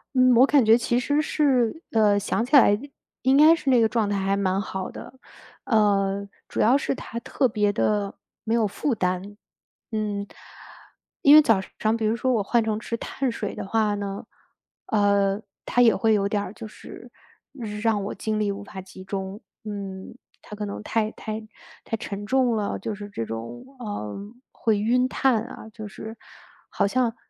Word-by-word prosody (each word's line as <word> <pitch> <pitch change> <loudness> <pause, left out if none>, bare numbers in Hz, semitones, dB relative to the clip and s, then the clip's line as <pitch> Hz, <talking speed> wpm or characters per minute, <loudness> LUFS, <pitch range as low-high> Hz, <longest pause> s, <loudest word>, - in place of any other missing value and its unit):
嗯， 255 -1 +5
我 255 +3 +7
感 280 -2 +4
觉 220 +1 +6
其 240 0 0
实 290 +4 +1
是 275 -2 +1
呃， 210 -2 +4
想 225 +3 -1
起 290 - +2
来 210 -5 +6 0.4
应 265 +1 +4
该 310 +3 +7
是 270 -5 -1
那 240 -2 +5
个 225 - +3
状 220 -2 +1
态 205 - -1
还 195 0 0
蛮 195 0 0
好 190 -1 -5
的， - - -9 0.5
呃， 200 -3 +2 0.2
主 - - -5
要 245 +5 +5
是 280 - -1
它 235 -2 -6
特 260 +1 +1
别 210 -2 +1
地 205 -1 0 0.3
没 225 - -1
有 225 -3 +3
负 270 +6 -1
担， 185 +2 -2 0.5
嗯。 210 -2 -2 1.0
因 285 - +8
为 310 - +10
早 225 -8 +3 0.2
上 220 +1 +2
比 225 -1 -2
如 225 +2 +1
说 255 +2 +1
我 210 -3 +1
换 235 +3 +2
成 215 -1 0
吃 230 +1 -4
碳 265 0 -2
水 210 -3 -4
的 - - -5
话 210 0 +1
呢， 200 -1 -5 0.6
呃， 200 -1 +2 0.2
它 245 - +2
也 230 -2 +6
会 225 -1 +2
有 200 -2 +2
点 205 -1 0
儿 - - -7
就 220 0 -8
是 - - -12 0.7
让 220 -3 +1
我 200 - -4
精 215 -1 -2
力 205 - +1
无 200 +1 -6
法 190 -1 -8
集 190 0 -13
中， 195 +1 -5 0.2
嗯， 200 -1 -7 0.3
它 - - -13
可 210 - -4
能 205 +1 -6
太 215 -1 0
太 215 0 -5 0.5
太 225 - -2
沉 205 -1 -6
重 250 0 +2
了， 205 - -2
就 220 - -4
是 205 0 -8
这 115 - -4
种， 115 +2 -7
呃， 205 - -5 0.3
会 220 -3 0
晕 250 +4 +2
碳 255 -5 +2
啊， 220 - -10
就 215 -2 -7
是 220 +2 -9 0.5
好 - - 0
像 240 +2 +1
215 Hz, 200 characters per minute, -24 LUFS, 200-235 Hz, 1.0 s, 为